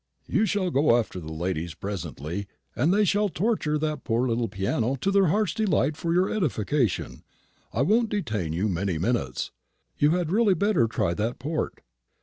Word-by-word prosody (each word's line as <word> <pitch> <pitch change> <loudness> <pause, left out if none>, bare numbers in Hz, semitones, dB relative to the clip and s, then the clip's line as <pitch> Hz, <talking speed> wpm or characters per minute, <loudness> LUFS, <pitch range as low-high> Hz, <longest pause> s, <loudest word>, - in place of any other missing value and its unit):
"You 215 +2 +1
shall 190 -4 0
go 135 -4 +4
after 110 -5 -2
the 80 -2 -8
ladies 85 0 -3
presently, 95 -1 -5 0.3
and 150 +8 +2
they 205 +2 +4
shall 205 +2 +2
torture 175 -5 0
that 150 -2 -2
poor 120 +2 +1
little 115 0 0
piano 110 +6 -1
to 190 +9 -1
their 195 -2 +4
hearts' 200 0 +1
delight 175 -9 +1
for 165 +2 -2
your 180 +2 +3
edification. 135 - -1 0.5
I 120 - +1
won't 220 - +3
detain 110 - -2
you 90 +6 0
many 95 -2 -1
minutes. 85 - -1 0.5
You 145 - +5
had 170 -3 -2
really 210 -1 +4
better 190 - +2
try 85 -6 0
that 110 +6 -2
port." 150 +5 -3
135 Hz, 170 wpm, -26 LUFS, -, 0.5 s, You